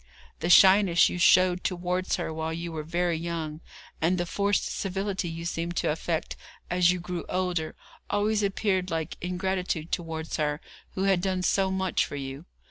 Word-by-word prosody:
The 170 - -2
shyness 190 -1 +7
you 180 - -4
showed 180 +1 +5
towards 180 0 -1
her 170 -3 -3
while 160 0 -3
you 170 +1 -4
were 160 -1 -4
very 170 +2 -1
young, 165 -2 -4 0.4
and 175 +3 +2
the 175 - -1
forced 200 +3 0
civility 195 -2 -2
you 165 +1 -6
seemed 170 0 -3
to - - +1
affect 165 +1 -2 0.4
as 180 -1 +4
you 180 0 +1
grew 175 -1 -5
older, 180 -4 -1 0.3
always 210 +1 +1
appeared 195 -2 0
like 160 -2 -3
ingratitude 180 -2 -2
towards 160 -1 -3
her 150 -1 0 0.4
who 190 - -1
had 195 -2 +3
done 185 -1 -1
so 190 +1 +2
much 190 -1 0
for - - -6
you. 135 +2 -6
175 Hz, 170 wpm, -27 LUFS, 165-190 Hz, 0.4 s, shyness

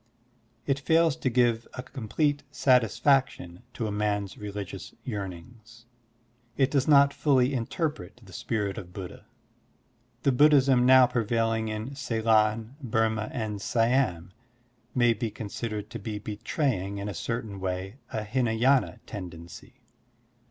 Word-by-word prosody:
It 135 -1 0
fails 160 +1 +3
to 130 - 0
give 120 -2 +2
a 130 - -5
complete 145 +4 -1
satisfaction 125 - +2
to 115 - -2
a 105 - -2
man's 105 -1 -1
religious 105 -2 -7
yearnings. 110 +3 -8 0.7
It 135 -1 +2
does 140 -2 +1
not 140 -1 +6
fully 135 -2 +2
interpret 125 - -3
the 95 - -14
spirit 110 -3 -2
of 90 -1 -11
Buddha. 95 -2 -9 1.0
The 140 - +4
Buddhism 135 -2 +5
now 130 0 +8
prevailing 115 -1 0
in 110 +5 -4
Ceylon, 115 -2 +1
Burma, 110 -3 0
and 110 -5 -4
Siam 115 -7 +1 0.6
may 120 -2 +4
be 115 0 -3
considered 105 0 -5
to 115 - -6
be 105 +1 -5
betraying 105 - -2
in 100 +1 -4
a 105 - -4
certain 110 +1 -4
way 95 +3 -4
a 110 - -3
Hinay^na 125 +3 +1
tendency. 95 +7 -10
115 Hz, 125 wpm, -27 LUFS, 105-130 Hz, 1.0 s, now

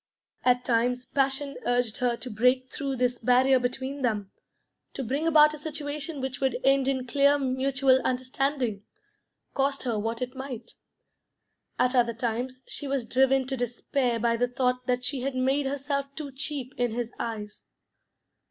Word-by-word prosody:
At 250 0 +3
times 245 +1 +1
passion 275 +1 0
urged 245 -2 0
her 245 -3 0
to 255 - -7
break 250 +4 +2
through 275 -1 -2
this 245 -1 0
barrier 255 +2 +4
between 260 +3 -3
them, 210 -6 -1 0.6
to 270 - -2
bring 275 +7 -1
about 305 -1 +6
a 305 - -7
situation 300 0 -4
which 265 +1 -3
would 265 -1 +1
end 270 0 +4
in 260 -2 0
clear 280 +3 +4
mutual 260 0 +2
understanding, 255 -4 -1 0.7
cost 275 0 0
her 235 -4 -1
what 225 +2 -2
it 250 +1 -6
might. 265 -3 -7 1.1
At 250 - +2
other 235 -2 +2
times 245 +2 -3
she 285 - -4
was 270 -3 -1
driven 265 +2 +3
to 265 +1 -2
despair 245 0 -1
by 230 0 +1
the 245 +1 +2
thought 250 0 -1
that 250 0 0
she 270 -2 -2
had 270 +1 -2
made 270 +2 +1
herself 280 0 -2
too 290 -2 -6
cheap 265 -1 -3
in 245 -2 +1
his 240 0 -3
eyes. 210 -2 -5
255 Hz, 160 wpm, -27 LUFS, 245-275 Hz, 1.1 s, about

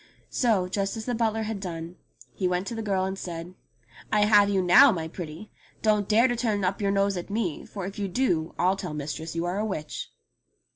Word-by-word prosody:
So, 215 -7 +2
just 195 +3 -2
as 220 - -5
the 245 - -1
butler 225 -1 0
had 215 -1 -3
done, 170 -2 -6 0.4
he 185 - -1
went 180 +1 0
to 240 - -4
the 225 - -3
girl 195 -3 0
and 190 0 -4
said, 170 0 -6 0.6
"I 210 -1 +3
have 205 -1 +6
you 195 -1 +2
now, 210 +10 +8
my 165 -5 -3
pretty. 165 +3 -8 0.3
Don't 210 -2 +2
dare 225 +4 +5
to 245 - 0
turn 220 -4 0
up 185 +3 0
your 200 - +1
nose 200 -1 +1
at 175 - -6
me, 200 -7 -2
for 195 -3 -6
if 195 +2 -6
you 200 - -1
do 175 -7 0
I'll 185 +2 +3
tell 155 -5 -5
mistress 155 +2 -5
you 165 +1 -1
are 180 +3 -1
a - - 0
witch." 190 -8 -4
195 Hz, 225 wpm, -26 LUFS, 180-215 Hz, 0.6 s, now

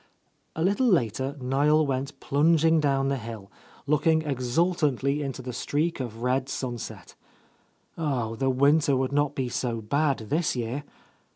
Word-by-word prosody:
A 160 - -1
little 200 +8 +2
later 135 - +1
Niel 145 +4 +2
went 135 0 -3
plunging 160 +2 +3
down 135 -2 +1
the 140 - 0
hill, 110 -3 -8 0.3
looking 155 +2 +2
exultantly 140 0 0
into 135 -2 -5
the 125 0 -5
streak 150 +7 -1
of 120 -2 -5
red 130 +1 0
sun 125 -3 -3
set. - - -9 0.9
Oh, 125 -8 -1
the 135 +3 0
winter 140 +2 +3
would 130 0 -1
not 145 0 +1
be 130 -2 -1
so 120 -1 -2
bad, 140 +6 +1
this 160 0 +1
year 125 +4 -3
140 Hz, 150 wpm, -26 LUFS, 125-150 Hz, 0.9 s, plunging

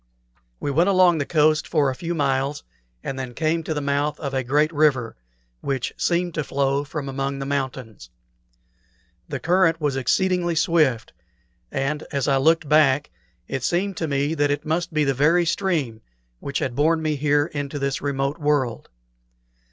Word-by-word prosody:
We 145 - -2
went 170 +7 +3
along 185 -4 +4
the 140 - -2
coast 155 -1 +2
for 140 -3 +2
a - - -6
few 170 +3 -4
miles, 140 -1 0 0.4
and 135 -1 -4
then 125 -2 -6
came 160 +1 0
to 160 - -2
the 150 - -2
mouth 145 +1 -1
of 140 -3 -4
a 130 -1 0
great 150 +6 +1
river, 145 -6 +2 0.4
which 130 - -3
seemed 175 0 0
to 150 - -2
flow 140 0 0
from 145 -1 -5
among 135 +1 -3
the 135 - -4
mountains. 130 - -4 1.2
The - - -3
current 170 -2 +2
was 145 -3 -1
exceedingly 175 +6 +1
swift, 155 - +1 0.6
and 140 +3 -1
as 140 -3 -1
I 135 -1 +3
looked 160 +3 +3
back 145 -1 +3 0.4
it 135 - -3
seemed 185 +8 0
to 160 - -2
me 140 +1 0
that 145 -2 +1
it 145 - -2
must 165 +3 -1
be 155 -1 +1
the 135 -1 +1
very 160 +6 +3
stream 155 - -1 0.4
which - - -4
had 120 - -2
borne 160 +3 +2
me 155 -1 0
here 145 +1 +2
into 145 -2 -5
this 140 -1 -2
remote 140 +1 -2
world. 145 -6 0
145 Hz, 175 wpm, -23 LUFS, 135-160 Hz, 1.2 s, along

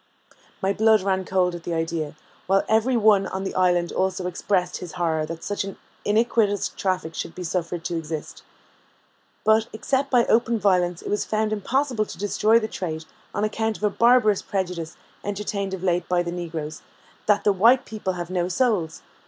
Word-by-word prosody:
My 195 +1 +2
blood 220 0 +4
ran 190 -1 0
cold 180 -1 +1
at 175 - -6
the 170 0 -3
idea, 165 -2 -2 0.3
while 195 +1 +3
every 225 +3 +3
one 210 -3 +4
on 190 0 -4
the 195 - -3
island 175 -2 +2
also 185 -1 -1
expressed 180 0 0
his 180 -2 -8
horror 160 -3 0
that 165 0 -7
such 205 -1 -2
an 195 0 -7 0.3
iniquitous 215 -1 +2
traffic 185 -4 -2
should 165 - -5
be 180 - -6
suffered 170 -1 -3
to 175 - -2
exist. 160 -1 -6 1.0
But, 220 +1 +4
except 270 +5 -1
by 245 -3 +4
open 230 0 +2
violence, 180 -4 +1
it - - -5
was 205 - +1
found 215 0 0
impossible 245 +2 0
to - - -9
destroy 210 +2 +3
the 220 - -3
trade, 160 -6 -5 0.3
on 205 - 0
account 220 0 -1
of - - -14
a 210 - +3
barbarous 230 -3 +4
prejudice, 180 -4 -3 0.3
entertained 200 -1 -3
of 185 - -10
late 180 -1 0
by 180 -1 +2
the 170 - -4
negroes, 160 -3 -5 0.5
that 210 -1 +3
the 205 - +4
white 230 +7 +5
people 210 -4 -3
have 175 0 -5
no 180 -1 0
souls! 185 -5 0
190 Hz, 185 wpm, -24 LUFS, 175-215 Hz, 1.0 s, white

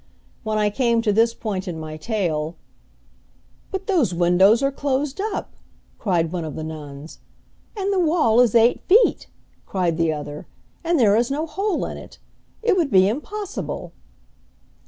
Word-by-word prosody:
When 215 -1 -2
I 210 -1 +2
came 235 0 +1
to 210 -3 +2
this 230 +2 +3
point 200 -4 -4
in 170 -3 -4
my 155 -1 -6
tale, 165 -4 -2 1.1
"But 385 0 -4
those 310 - +1
windows 185 +7 +4
are 275 - +2
closed 280 +3 -2
up!" 425 0 -4 0.5
cried 170 -6 0
one 180 -2 -3
of 155 -2 -6
the 155 - -5
nuns. 150 -1 -9 0.6
"And 400 0 -1
the 385 - +1
wall 310 -9 +3
is 240 -3 +4
eight 235 +1 +4
feet!" 435 +6 +4 0.4
cried 175 -4 -1
the 165 -1 +2
other, 150 -1 -6 0.4
"and 335 -1 +1
there 210 -4 +5
is 235 +2 +2
no 295 +3 -1
hole 390 +3 -2
in - - -6
it! - - -12 0.5
It 450 -4 +3
would 335 -6 +1
be 190 -4 +5
impossible!" 385 - -4
225 Hz, 160 wpm, -22 LUFS, -, 1.1 s, there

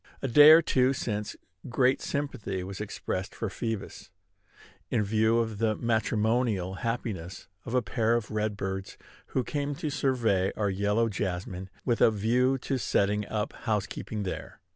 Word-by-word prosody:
A - - +1
day 145 +4 +8
or 160 +1 +9
two 130 +1 +3
since, 105 -5 -3 0.3
great 130 +2 +2
sympathy 110 -10 -3
was 95 +2 -6
expressed 95 -2 -4
for 110 -4 -3
Phoebus, 115 -2 -5 0.8
in 105 - +1
view 110 +2 +2
of 110 -3 -1
the 110 -1 +2
matrimonial 110 -3 0
happiness 110 -7 -4 0.2
of 120 - -3
a 125 - +3
pair 110 +4 +1
of 115 -3 -2
red 105 -1 -1
birds 95 -1 -4 0.3
who 130 - -1
came 145 +1 -2
to 150 +1 -3
survey 115 -9 +1
our 105 -2 +1
yellow 105 +4 +1
jessamine 95 -1 -4 0.2
with 120 -2 +1
a - - +7
view 120 +5 +2
to 135 0 -2
setting 105 -2 +1
up 105 0 -2
housekeeping 105 -1 -3
there. 95 - -6
110 Hz, 155 wpm, -28 LUFS, 100-120 Hz, 0.8 s, or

